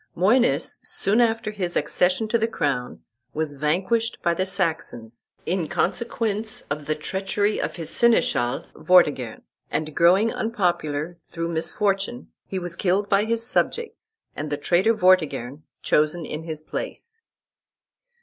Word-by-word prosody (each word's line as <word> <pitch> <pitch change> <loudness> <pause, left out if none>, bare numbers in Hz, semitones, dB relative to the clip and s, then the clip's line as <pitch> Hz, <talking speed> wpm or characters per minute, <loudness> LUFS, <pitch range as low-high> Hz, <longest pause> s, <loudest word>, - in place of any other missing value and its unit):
Moines, 185 - +2
soon 215 +5 +1
after 225 -2 +1
his 185 -4 -3
accession 185 +5 +1
to 235 +2 +1
the 225 - +1
crown, 140 - -2 0.3
was 155 -1 -1
vanquished 185 - 0
by 170 - +3
the 185 +3 -1
Saxons, 155 - -2 0.2
in 175 -2 -1
consequence 215 +3 -1
of 145 0 -3
the 155 - +1
treachery 195 +6 -1
of - - -3
his 165 -2 -4
seneschal, 235 - +2
Vortigern, 150 -9 +3 0.3
and 155 -1 -3
growing 190 +7 +4
unpopular, 175 -7 -1
through 165 0 -4
misfortune, 195 +7 -1 0.2
he 190 - -4
was 175 -2 -4
killed 195 +3 0
by 200 +1 +3
his 230 0 0
subjects, 445 - -2 0.2
and 150 +1 -4
the 145 - -1
traitor 185 +9 +2
Vortigern 155 - +2 0.2
chosen 155 +2 +2
in 155 +2 -6
his 155 -2 -5
place. 455 - -6
180 Hz, 135 wpm, -24 LUFS, 155-215 Hz, 0.3 s, growing